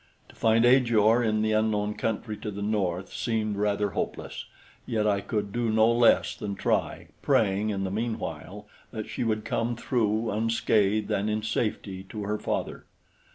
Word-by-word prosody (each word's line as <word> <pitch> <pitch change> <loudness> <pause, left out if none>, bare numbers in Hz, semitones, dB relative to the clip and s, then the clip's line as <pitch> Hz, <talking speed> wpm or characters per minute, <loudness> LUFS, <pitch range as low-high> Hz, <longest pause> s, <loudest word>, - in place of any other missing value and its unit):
To - - -17
find 115 +1 +3
Ajor 120 -3 +4
in 110 -1 +1
the 110 - +1
unknown 105 -1 +1
country 110 0 -3
to 105 - -5
the 100 0 -5
north 95 -3 -1
seemed 110 -3 -1
rather 105 0 0
hopeless; - - -4 0.4
yet 110 -2 0
I 100 -2 +2
could 105 -1 -3
do 120 +1 -1
no 110 +1 +4
less 120 0 +4
than 100 -1 -5
try, - - -1
praying 105 0 +2
in 100 -2 -2
the 95 - -2
meanwhile 105 -3 -4 0.2
that 110 -3 -6
she 110 - -3
would 110 -2 -1
come 120 +1 -1
through 110 -2 0
unscathed 110 -1 +1
and 100 +2 0
in 105 0 -1
safety 105 -4 -2
to 105 -2 -5
her 105 +1 -2
father. - - -3
110 Hz, 165 wpm, -27 LUFS, 105-115 Hz, 0.4 s, Ajor